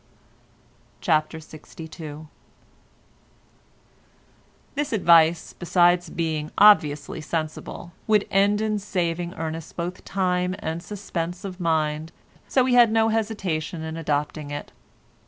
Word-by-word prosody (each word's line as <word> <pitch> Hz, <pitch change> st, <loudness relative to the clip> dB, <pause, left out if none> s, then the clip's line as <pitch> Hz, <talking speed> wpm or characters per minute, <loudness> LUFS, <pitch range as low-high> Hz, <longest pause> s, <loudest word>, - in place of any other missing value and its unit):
CHAPTER 155 Hz, -2 st, +1 dB
LXII 155 Hz, 0 st, -10 dB, 2.5 s
This 290 Hz, +1 st, -2 dB
advice, 170 Hz, -5 st, +4 dB
besides 175 Hz, 0 st, +2 dB
being 155 Hz, -2 st, -2 dB
obviously 160 Hz, -8 st, +4 dB
sensible, 160 Hz, +2 st, -5 dB, 0.2 s
would 210 Hz, -2 st, +3 dB
end 200 Hz, +2 st, +3 dB
in 215 Hz, -1 st, 0 dB
saving 175 Hz, -3 st, -2 dB
Ernest 160 Hz, 0 st, -5 dB
both 175 Hz, +1 st, -4 dB
time 180 Hz, -1 st, 0 dB
and 160 Hz, +1 st, -4 dB
suspense 180 Hz, -2 st, -5 dB
of 185 Hz, -1 st, -7 dB
mind, 160 Hz, -2 st, 0 dB, 0.4 s
so 260 Hz, -, +3 dB
we 255 Hz, 0 st, +1 dB
had 240 Hz, -2 st, +6 dB
no 225 Hz, 0 st, +3 dB
hesitation 195 Hz, -8 st, -2 dB
in 160 Hz, 0 st, -5 dB
adopting 150 Hz, -1 st, -2 dB
it. 145 Hz, 0 st, -6 dB
170 Hz, 105 wpm, -24 LUFS, 160-200 Hz, 2.5 s, had